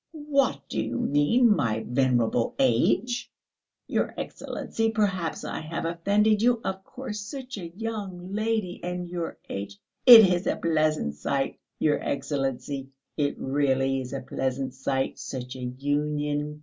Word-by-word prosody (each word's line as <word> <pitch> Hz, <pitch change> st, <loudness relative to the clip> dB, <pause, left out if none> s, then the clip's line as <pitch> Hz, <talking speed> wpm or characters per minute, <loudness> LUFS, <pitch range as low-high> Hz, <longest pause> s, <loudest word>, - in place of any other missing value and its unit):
"What 280 Hz, -, +1 dB
do 110 Hz, -, -2 dB
you 115 Hz, +1 st, -3 dB
mean 210 Hz, -, +4 dB
by 110 Hz, -, 0 dB
venerable 125 Hz, -2 st, +1 dB
age?" 190 Hz, -, +2 dB, 0.5 s
"Your -, -, 0 dB
Excellency! 225 Hz, 0 st, -3 dB
Perhaps 195 Hz, -6 st, -1 dB
I -, -, -4 dB
have 165 Hz, +2 st, -4 dB
offended 205 Hz, +6 st, +2 dB
you? 240 Hz, 0 st, +4 dB
Of 190 Hz, 0 st, -3 dB
course 230 Hz, -3 st, -6 dB
such 255 Hz, +2 st, -7 dB
a 170 Hz, -2 st, -6 dB
young 200 Hz, -5 st, -5 dB
lady... 215 Hz, -4 st, -1 dB
and 180 Hz, 0 st, -3 dB
your 175 Hz, -1 st, -4 dB
age... 100 Hz, 0 st, -5 dB, 0.3 s
it 235 Hz, -3 st, +13 dB
is 180 Hz, +1 st, 0 dB
a -, -, +2 dB
pleasant 155 Hz, -, +1 dB
sight, 135 Hz, -, -1 dB, 0.2 s
your 150 Hz, -2 st, +2 dB
Excellency, 135 Hz, -1 st, -2 dB, 0.3 s
it 145 Hz, -2 st, 0 dB
really 135 Hz, -1 st, +1 dB
is 125 Hz, -, -7 dB
a 135 Hz, -1 st, -4 dB
pleasant 130 Hz, 0 st, -2 dB
sight 135 Hz, 0 st, -2 dB
such 125 Hz, -1 st, -6 dB
a -, -, -8 dB
union 145 Hz, +3 st, -2 dB
150 Hz, 140 wpm, -26 LUFS, 135-205 Hz, 0.5 s, it